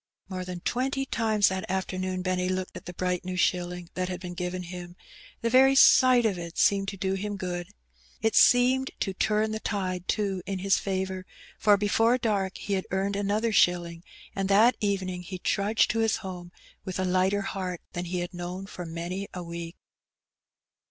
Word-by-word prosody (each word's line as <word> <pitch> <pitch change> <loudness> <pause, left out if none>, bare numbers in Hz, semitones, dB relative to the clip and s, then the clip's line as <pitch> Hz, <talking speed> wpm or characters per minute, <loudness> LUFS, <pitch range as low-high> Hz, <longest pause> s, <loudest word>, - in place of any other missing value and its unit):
More 185 -1 -4
than 180 -1 -6
twenty 270 +5 -1
times 220 -5 +2
that 190 0 -4
afternoon 185 -1 -2
Benny 185 0 0
looked 185 0 -3
at - - -9
the 180 - -7
bright 180 0 -1
new 185 0 -4
shilling 180 -1 0
that 185 0 -2
had 180 -1 -4
been 180 -1 -7
given 180 +1 -4
him; 175 0 -8 0.5
the 230 - +1
very 265 +2 +6
sight 255 -2 +7
of 195 -5 0
it 170 -1 -7
seemed 195 -1 +3
to 195 - -4
do 190 0 -1
him 205 +1 -3
good. 175 -2 -4 0.5
It 220 0 +1
seemed 255 +2 +5
to 195 - -1
turn 215 +3 +1
the 220 - -3
tide, 185 -4 -3
too, 195 -3 0
in 195 - -2
his 195 +1 +2
favour, 190 -1 -3 0.3
for 205 -1 +5
before 225 +4 +3
dark 200 -5 -1
he 200 - -4
had 190 -1 -1
earned 195 +1 -1
another 205 +3 0
shilling; 175 -3 +2 0.3
and 195 0 -1
that 220 +5 +5
evening 190 -4 -1
he 185 +1 -7
trudged 205 +4 +1
to 225 - -1
his 225 -2 +2
home 175 -2 -7 0.3
with 185 - -5
a 185 - +1
lighter 185 +2 +2
heart 185 -3 -4
than 175 0 -3
he 180 +1 -2
had 175 +1 -5
known 180 +2 -5
for 180 -3 -8
many 175 +4 -4
a 180 - -5
week. 170 0 -7
190 Hz, 190 wpm, -27 LUFS, 180-205 Hz, 0.5 s, sight